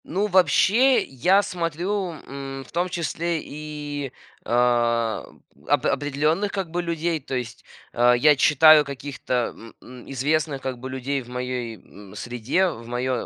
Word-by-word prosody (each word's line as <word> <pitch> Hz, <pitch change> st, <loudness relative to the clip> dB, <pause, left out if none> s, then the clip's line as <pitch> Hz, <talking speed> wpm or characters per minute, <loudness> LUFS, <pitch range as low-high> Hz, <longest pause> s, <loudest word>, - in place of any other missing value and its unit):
Ну, 195 Hz, +5 st, -1 dB
вообще, 205 Hz, -, +4 dB
я 180 Hz, +10 st, +2 dB
смотрю, 180 Hz, +2 st, -2 dB
м, 135 Hz, -1 st, -7 dB
в -, -, -18 dB
том 175 Hz, +2 st, -1 dB
числе 170 Hz, 0 st, -2 dB
и, 145 Hz, -2 st, -6 dB, 0.3 s
о, 120 Hz, -2 st, +1 dB, 0.4 s
оп -, -, +2 dB
определённых, 150 Hz, +8 st, 0 dB
как 190 Hz, -5 st, -4 dB
бы, 175 Hz, +1 st, -1 dB
людей. 170 Hz, -1 st, -1 dB
То 130 Hz, -1 st, -6 dB
есть, 120 Hz, -2 st, -5 dB, 0.3 s
о, 120 Hz, +1 st, +4 dB
я 150 Hz, +4 st, +5 dB
читаю 155 Hz, +2 st, +6 dB
каких-то, 140 Hz, -1 st, -6 dB, 0.2 s
м 115 Hz, 0 st, -13 dB
м, 125 Hz, -1 st, -12 dB
известных, 145 Hz, +2 st, 0 dB
как 130 Hz, -2 st, -4 dB
бы, 130 Hz, +1 st, -7 dB
людей 135 Hz, +1 st, -2 dB
в 120 Hz, -, -14 dB
моей, 125 Hz, -2 st, -4 dB
м, 100 Hz, 0 st, -15 dB
среде, 125 Hz, -, 0 dB
в 115 Hz, -7 st, -9 dB
моё 125 Hz, 0 st, -2 dB
140 Hz, 150 wpm, -24 LUFS, 125-170 Hz, 0.4 s, читаю